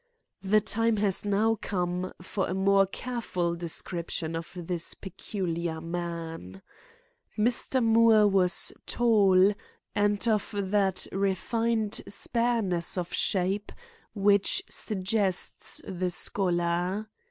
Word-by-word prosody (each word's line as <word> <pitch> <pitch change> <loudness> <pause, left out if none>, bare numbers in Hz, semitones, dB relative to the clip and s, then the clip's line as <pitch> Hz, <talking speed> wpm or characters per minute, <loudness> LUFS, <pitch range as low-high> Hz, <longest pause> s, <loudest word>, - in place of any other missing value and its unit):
The 210 +2 +3
time 225 +1 +1
has 200 -1 +1
now 210 +2 +1
come 180 -1 -2
for 190 +1 -2
a 185 - -3
more 195 0 +3
careful 190 -6 -3
description 170 -1 -2
of 165 +1 -5
this 175 -1 -3
peculiar 175 -4 -4
man. 165 - -6 0.7
Mr. 240 +3 +1
Moore 225 -2 +5
was 190 -2 +3
tall 205 -5 +4 0.4
and 205 +2 +1
of 215 -1 0
that 195 -1 +1
refined 215 +3 -1
spareness 205 -6 0
of 175 -1 -3
shape 195 +2 0 0.4
which 200 -1 +3
suggests 195 -2 -2
the 185 -1 -2
scholar. 175 +2 0
195 Hz, 100 wpm, -28 LUFS, 175-210 Hz, 0.7 s, Moore